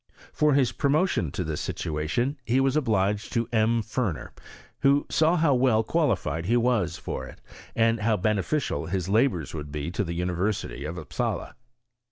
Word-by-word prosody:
For 150 -2 +3
his 135 -3 +3
promotion 145 - +1
to 90 - -2
this 80 -3 -3
sitoation 80 - -2
be 125 +3 +3
was 135 +1 +2
obliged 105 -7 +1
to 115 -1 0
M. 115 +1 +2
Ferner, 105 - -3 0.5
who 140 +1 +3
saw 160 +2 +3
how 155 -3 +3
well 125 -3 +3
qua 160 +6 +1
lified 85 -7 -1
he 120 +6 +3
was 115 -8 +1
for - - -5
it, - - -13 0.4
and 115 0 +3
how 110 0 +1
beneficial 105 - -1
his 90 0 -2
labouil 100 - +1
would 75 -2 -6
be 75 +2 -4
to 100 - -1
the 85 -3 -4
University 90 -2 -2
of 80 +3 -5
Upsala. - - -3
110 Hz, 170 wpm, -26 LUFS, 90-130 Hz, 0.5 s, For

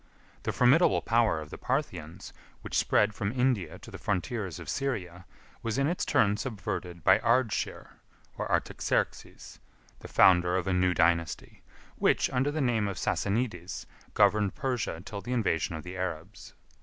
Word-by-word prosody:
The - - -2
formidable 135 +8 +4
power 115 -7 +2
of 75 - -10
the - - -8
Parthians, 90 - -3 0.3
which - - -6
spread 105 +1 +3
from 100 0 -2
India 125 -9 0
to - - -13
the - - -9
frontiers 100 - -2
of - - -9
Syria, 95 -10 -3 0.3
was 115 +1 -2
in 140 - +2
its 170 +5 -1
turn 105 -1 +3
subverted 90 -7 -5
by - - +6
Ardshir, 115 -1 0 0.5
or - - -4
Artaxerxes; - - -2 0.4
the - - -10
founder 90 -1 +5
of 90 - -2
a 95 - 0
new 90 0 +2
dynasty, 85 +1 0 0.4
which, - - +2
under 135 +2 +1
the 150 +1 -2
name 115 -5 +1
of 100 -3 -4
Sassanides, 100 -4 -2 0.3
governed 105 -1 +3
Persia 125 - -2
till 100 -2 -6
the 125 - -4
invasion 95 -8 0
of 80 - -7
the 90 +1 -8
Arabs. 90 -4 -6
100 Hz, 155 wpm, -29 LUFS, 90-125 Hz, 0.5 s, by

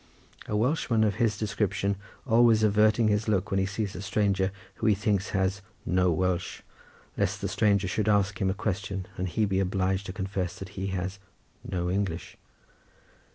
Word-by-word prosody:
A 105 - 0
Welshman 115 -2 +2
of 105 -2 +1
his 110 -3 +2
description 105 -2 0 0.3
always 115 -2 +5
averts 105 0 +4
his 110 -2 +2
look 100 -1 0
when 95 - +2
he 95 - +1
sees 100 -1 -3
a 90 - -5
stranger 100 -1 +1 0.3
who 110 - 0
he 105 - +5
thinks 100 -1 0
has 95 0 0 0.2
"no 90 0 +2
Welsh," 90 +1 -1 0.5
lest - - 0
the - - -2
stranger 100 -2 +2
should 110 +3 0
ask 100 -1 +2
him 95 - +2
a 95 - -1
question 95 -2 -3
and 95 0 -2
he 110 +5 +1
be 95 -1 0
obliged 95 0 0
to - - -4
confess 95 -2 -3
that 95 - -7
he 100 -2 -4
has 95 +1 -3 0.4
"no 90 -2 -2
English." 95 -3 -2
100 Hz, 175 wpm, -28 LUFS, 95-105 Hz, 0.5 s, always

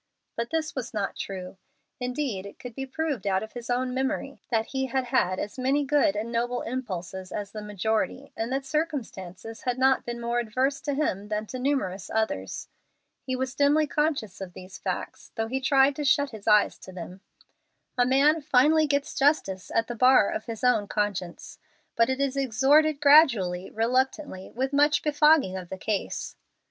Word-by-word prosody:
But 235 0 -3
this 320 -1 -2
was 250 -4 -5
not 200 -2 -2
true. 185 -1 -6 0.4
Indeed, 250 -6 -3
it 200 - -12
could 245 -2 -9
be 270 +3 -5
proved 290 -4 -3
out 190 0 +1
of 220 - -8
his 240 -1 -8
own 250 +1 0
memory 265 +1 -2
that 225 -2 +1
he 265 +1 -2
had 260 +1 0
had 240 -8 +1
as 205 +6 -5
many 275 +3 +1
good 275 -7 +3
and 220 +3 -3
noble 240 +1 -1
impulses 190 -7 -5
as 205 -1 -5
the 215 - -6
majority, 220 +6 -2
and 225 +2 -3
that 270 +1 -1
circumstances 225 - -4
had 250 -1 -1
not 265 0 +3
been 240 0 -5
more 235 +1 -1
adverse 255 +4 -1
to 285 -2 -2
him 205 -9 -1
than 210 0 -2
to 255 +4 -6
numerous 250 -9 -1
others. 220 - -2 0.6
He 260 - 0
was 260 0 -2
dimly 290 +2 +3
conscious 285 - -1
of 185 -2 -7
these 185 +1 -11
facts, - - -5
though 225 - -1
he 260 +4 -3
tried 270 0 +4
to 300 - -2
shut 285 0 +2
his 215 -2 -11
eyes 210 -1 +4
to 190 - -11
them. 185 +1 -9 0.7
A 250 - +4
man 280 +5 +4
finally 300 +2 +4
gets 285 0 0
justice 270 -10 +1
at 230 - +1
the 240 - -5
bar 250 -3 +5
of 215 - -4
his 230 -1 -7
own 245 -5 +3
conscience, 200 -5 -3 0.4
but 230 +1 +3
it 260 +1 -1
is 275 -1 0
extorted 275 +4 +3
gradually, 235 - +5
reluctantly, 250 -2 -1
with 265 +3 -3
much 295 +1 +3
befogging 300 -8 +4
of 185 -2 -6
the 190 - -5
case. 200 +1 -3
250 Hz, 185 wpm, -26 LUFS, 210-275 Hz, 0.7 s, bar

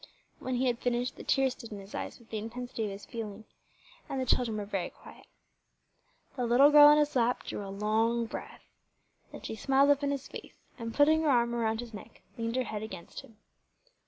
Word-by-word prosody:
When 255 0 -3
he 250 +2 +1
had 240 -2 0
finished, 245 0 -1
the - - -10
tears 270 -1 +2
stood 230 -3 -11
in 210 - -6
his 195 +1 -12
eyes - - -5
with 235 -2 -21
the 220 - -2
intensity 235 +1 -5
of - - -3
his 195 +1 -8
feeling, 220 -2 -7 0.6
and 270 - -2
the 260 - -1
children 235 -3 +1
were 205 - -3
very 195 -3 -3
quiet. - - -16 1.1
The 250 -2 -1
little 265 +5 +6
girl 295 0 +10
on 295 0 +7
his 295 -1 +1
lap 245 0 +1
drew - - -5
a 195 - -7
long 220 +4 +1
breath. - - -8 0.7
Then - - -10
she - - -5
smiled 270 +5 +3
up 285 0 +2
in 285 - 0
his 280 -1 -3
face, - - -10 0.2
and, 230 -1 -4
putting 305 +5 +4
her 315 - +1
arm 235 -2 +3
around 225 -1 0
his 235 -2 -10
neck, 205 - -11
leaned 230 0 -3
her 255 - +1
head 215 -3 -5
against 190 -6 -8
him. 225 - -19
235 Hz, 215 wpm, -30 LUFS, 220-260 Hz, 1.1 s, girl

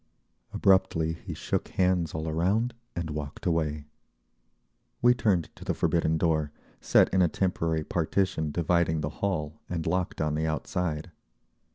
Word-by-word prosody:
Abruptly 95 -4 +3
he 85 - -8
shook - - -2
hands 90 -4 +1
all 80 +1 -3
around 95 +10 +1 0.2
and 85 -2 -3
walked 75 -2 -6
away. 75 -3 0 1.1
We 120 +1 +6
turned 105 -9 0
to - - -11
the - - -1
forbidden 80 -2 +1
door, 80 -3 +1 0.3
set - - +4
in 95 - +4
a 90 - +5
temporary 85 -3 0
partition 85 -1 0
dividing 85 0 +1
the 75 - -2
hall 80 -6 -2
and 85 -2 -3
locked 90 +2 -1
on 75 -1 0
the 80 +1 0
outside. 80 +1 -2
80 Hz, 145 wpm, -28 LUFS, 80-90 Hz, 1.1 s, We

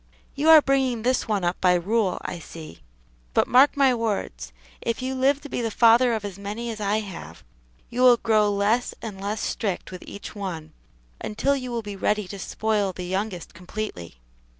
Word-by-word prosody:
You 295 +3 +1
are 315 -2 +9
bringing 265 -4 +1
this 255 +1 +1
one 205 -4 0
up 175 +1 -1
by 180 -1 +5
rule, 195 +2 0
I 175 - -5
see; 155 - -11 0.5
but - - +3
mark 270 +4 +5
my 270 -2 +5
words: 195 - -3 0.3
if 230 - -2
you 260 +1 -2
live 270 +2 +2
to - - -8
be 255 - -3
the 230 - -1
father 235 +2 +5
of 215 -2 -4
as 200 -1 -7
many 215 +4 -4
as 215 -1 -7
I 210 +2 +1
have, 165 - -9 0.4
you 245 - -3
will 250 -1 +7
grow 215 -2 +2
less 205 +5 +1
and 200 -4 -6
less 210 +2 -3
strict 195 -4 -3
with 185 - -8
each 200 - -8
one, 170 -7 -6 0.5
until 275 +6 0
you 255 -2 -5
will 235 -2 -3
be 205 -1 -6
ready 210 +1 0
to 200 - -7
spoil 210 -1 -1
the 180 0 -6
youngest 190 -1 -3
completely." 180 - -6
210 Hz, 195 wpm, -24 LUFS, 190-240 Hz, 0.5 s, are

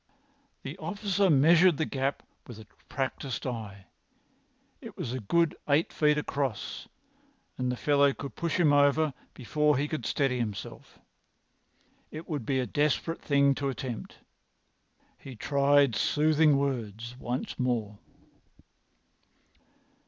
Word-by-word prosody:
The - - -7
officer 200 -2 0
measured 165 +3 +5
the 160 - 0
gap 135 0 -2 0.2
with 120 - -10
a 110 - -12 0.2
practised 135 -1 -3
eye. 105 -6 -6 1.0
It - - -11
was 120 - -4
a 130 - -3
good 165 +9 +1
eight 145 +3 +2
feet 150 -1 +2
across, 140 -6 -3 0.7
and 125 -1 -1
the - - -2
fellow 140 0 +3
could 140 0 -7
push 170 0 -2
him 155 -4 +4
over 145 +1 +3 0.2
before 150 +3 +1
he 145 +2 0
could 155 0 -4
steady 135 -3 0
himself. 105 -4 -6 1.1
It 155 +2 -9
would 145 -8 -4
be 135 -2 +1
a 125 - 0
desperate 150 +4 -1
thing 140 -1 +3
to 140 0 -2
attempt. 130 -3 -6 1.0
He 135 -2 -10
tried 140 0 +3
soothing 150 +4 +3
words 120 -4 -3
once 125 +1 -4
more. 115 -5 -1
140 Hz, 125 wpm, -28 LUFS, 125-150 Hz, 1.1 s, measured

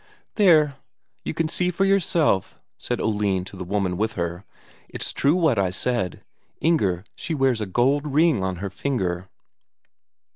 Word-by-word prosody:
"There, 155 -9 +4 0.5
you - - -4
can 165 -1 0
see 180 +3 0
for 185 +2 +1
yourself," 170 - +1 0.2
said - - -3
Oline 105 -4 0
to 100 - -11
the 95 - -6
woman 95 -1 -1
with 110 +3 -1
her. 85 +1 -3 0.5
"It's - - -5
true 145 +4 +2
what 160 - +2
I 95 -2 +2
said, 95 -1 -2 0.4
Inger 100 - +1
she 165 - -4
wears 135 -5 +1
a 105 - -2
gold 135 +9 +1
ring 150 - +3
on 95 -1 -1
her 95 +2 -5
finger." 95 -7 -2
115 Hz, 155 wpm, -24 LUFS, 95-155 Hz, 0.5 s, There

